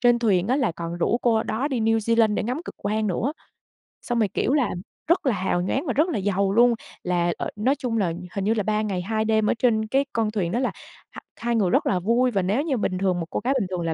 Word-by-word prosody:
trên 240 -1 +4
thuyền 205 -4 +1
á 260 - +2
là 255 - +1
còn 170 0 -5
rủ 235 - +1
cô 230 -3 +2
đó 250 +7 -2
đi 260 -5 -1
New 225 0 +2
Zealand 225 -1 +2
để - - -1
ngắm 250 +7 -2
cực - - -8
quang 215 +1 -1
nữa. 220 - -1 0.7
Xong 240 -2 -1
rồi, 215 - +3
kiểu 255 - +1
là, 275 -8 +2 0.4
rất 340 -2 +2
là 260 - +3
hào 185 -2 0
nhoáng 265 - -1
và 250 - 0
rất 305 +5 +3
là - - -1
giàu 195 0 0
luôn, 240 +3 +5 0.3
là, 175 -1 +1
ờ - - -3
nói 250 +7 +1
chung 240 -5 -2
là 180 -5 0 0.2
hình 195 - -2
như 220 - +3
là 215 -2 -1
3 215 +2 0
ngày 200 -4 -2
2 220 +4 -1
đêm 220 -1 +2
ở - - +3
trên 220 -3 +2
cái 270 +5 +1
con 225 -2 0
thuyền 190 -6 -1
đó 240 - 0
là 255 - 0 0.4
h - - -10 0.2
hai 235 0 -2
người 200 -5 +2
rất - - +2
là 185 - +1
vui 235 +7 +2
và 195 -4 +1
nếu 205 +9 +1
như 285 -6 -1
bình 185 -3 -1
thường 185 -1 0
một 165 - -3
cô - - -2
gái 265 - +2
bình 200 - -1
thường 180 -2 -3
là 165 -1 -1
220 Hz, 280 wpm, -24 LUFS, 190-245 Hz, 0.7 s, luôn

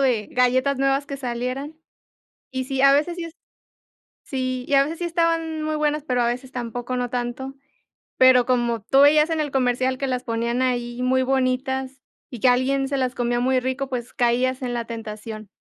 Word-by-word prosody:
de 245 -6 +1
galletas 255 +2 +2
nuevas 275 +1 +1
que 275 - -5
salieran. 255 +4 -4 0.8
Y 260 0 -2
sí, 265 0 -2
a 275 0 +7
veces 310 +5 +1
sí 345 -1 -5
es 330 - -10 0.9
Sí, 255 -2 -3
y 285 - 0
a 275 - +6
veces 315 +4 -4
sí 350 - -3
estaban 330 -2 0
muy 310 0 -1
buenas, 300 0 0
pero 250 -4 -1
a - - +2
veces 250 +2 -3
tampoco 245 0 -4
no 245 -1 -2
tanto. 250 +2 -4 0.6
Pero 255 -1 +6
como 240 -3 0
tú 270 +6 +3
veías 300 +3 +6
en 320 - 0
el 295 -1 -2
comercial 255 0 +1
que 275 +1 -2
las 255 -1 -2
ponían 235 +1 -1
ahí 245 -1 -1
muy 260 +1 +2
bonitas, 265 0 -1 0.3
y 245 - -9
que 255 - +4
alguien 270 +2 +2
se 275 0 -1
las 255 -1 -1
comía 240 0 0
muy 260 +1 +2
rico, 260 +2 -3
pues, 245 -2 -5
caías 250 +2 +1
en 245 -1 -3
la 235 - -2
tentación. 215 -1 -7
255 Hz, 195 wpm, -23 LUFS, 245-275 Hz, 0.9 s, a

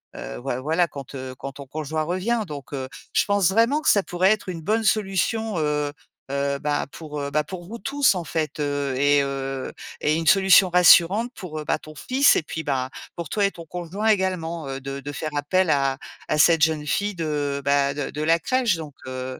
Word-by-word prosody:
heu, - - -7
voi 120 - -3
voilà, 165 +5 +1
quand, 140 -2 -9
heu, 130 -1 -6
quand 135 +3 -6
ton 140 -1 -10
conjoint 155 +2 -3
revient, 185 +8 -1
donc 145 -2 -8
heu, 130 -1 -3 0.3
je - - +3
pense 200 -3 +2
vraiment 230 +8 +3
que - - +2
ça 200 - +5
pourrait 185 +2 +2
être 210 -3 -1
une 165 -2 -5
bonne 220 +4 +1
solution, 215 -1 0
heu 150 -1 -1 0.4
heu, 140 0 0
ben, 145 -1 -1
pour, 150 -2 -7
heu, 140 - -3
ben, 150 +1 +1
pour 180 0 -8
vous 230 +3 -7
tous, 275 -5 +2
en 175 - -3
fait, 155 -1 -3
heu, 145 -2 -1
et 145 +1 +4
heu, 135 -1 -4 0.3
et 155 +1 +2
une 165 0 -2
solution 190 -1 +6
rassurante 180 +6 +6
pour, 155 -4 -7
heu, - - -5
bah, - - 0
ton 155 - -12
fils 265 - +3
et - - +2
puis, 160 0 -5
ben, 130 -2 -1 0.3
pour 170 -3 -6
toi 205 -2 +1
et 200 - +1
ton 170 -1 -11
conjoint 180 +6 -4
également, 175 -6 0
heu, 135 0 -4
de 135 +1 -5
de 145 +2 -6
faire 155 +2 -4
appel 180 +5 +1
à 135 -1 +1 0.3
à 155 - 0
cette 165 +1 +5
jeune 155 -2 +2
fille 205 +4 0
de, 145 -3 -2
bah, 140 0 +2
de 145 - -3
de 150 - -5
la 165 +2 +4
crèche, 245 +2 +1
donc 150 -3 -8
heu 130 0 -5
155 Hz, 220 wpm, -24 LUFS, 140-190 Hz, 0.4 s, solution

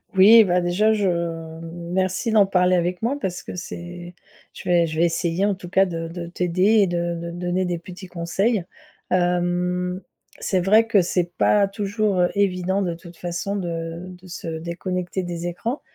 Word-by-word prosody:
Oui, 215 +4 +9
bah, 180 -2 +2
déjà, 190 +5 +2
je 205 -3 +1
m 165 -1 -3 0.2
merci 190 +5 0
d'en 210 -2 +6
parler 185 -1 +3
avec 180 +1 -1
moi 250 +6 0
parce 180 -7 -3
que - - -7
c'est 175 0 -8 0.4
je - - -10
vais 175 -1 +4
je 160 0 -4
vais 170 - +5
essayer, 170 +2 0
en 205 -1 +1
tout 180 -1 -10
cas, 195 +1 +4
de 165 -2 -4
de 170 +1 -6
t'aider 180 +1 -1 0.2
et 195 - +4
de 175 -1 -1
de 170 0 -5
donner 180 +1 -1
des 175 -1 -2
petits 185 +2 -10
conseils, 180 +5 0 0.5
hem, 180 +1 0 0.4
c'est 190 - 0
vrai 215 +5 +5
que 210 -4 +4
c'est 175 0 -1
pas 200 -1 +4
toujours 200 -1 0
évident 190 0 +1
de 175 -2 -1
toute 170 0 -13
façon 175 +4 -3
de 170 -2 -4
de 180 0 -13
se 175 -1 -7
déconnecter 175 +3 -3
des 175 0 -4
écrans 225 - -3
180 Hz, 180 wpm, -23 LUFS, 170-190 Hz, 0.5 s, Oui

